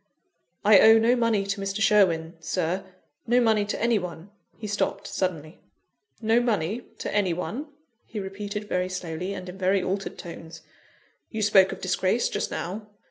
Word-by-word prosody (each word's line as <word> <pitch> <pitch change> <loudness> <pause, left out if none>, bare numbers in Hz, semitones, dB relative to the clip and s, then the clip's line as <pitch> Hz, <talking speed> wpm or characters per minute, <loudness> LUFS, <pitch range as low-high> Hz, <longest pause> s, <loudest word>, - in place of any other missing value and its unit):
"I 205 -1 +8
owe 220 +1 +8
no 230 +2 +4
money 230 -4 +1
to 200 0 -3
Mr. 195 +1 -3
Sherwin, 175 -7 +3
Sir 180 +3 -2 0.4
no 240 +2 +4
money 220 -3 +3
to 205 - -3
any 235 -1 +2
one." 180 +1 -8 0.3
He 220 - -8
stopped 205 0 -2
suddenly: 165 -4 -3 0.6
"No 225 +1 +3
money 225 -2 0 0.2
to - - -4
any 195 -4 +2
one?" 240 - -4 0.4
he 215 - -5
repeated 205 +2 -5
very 180 -2 -1
slowly, 180 +1 -4
and 185 - -7
in 180 +2 -9
very 190 0 +2
altered 195 +1 -3
tones. 165 -2 -10 0.7
"You 220 -1 -3
spoke 195 -2 +5
of - - -7
disgrace 185 +5 +1
just - - -2
now. 205 +5 -5
195 Hz, 165 wpm, -26 LUFS, 180-215 Hz, 0.7 s, I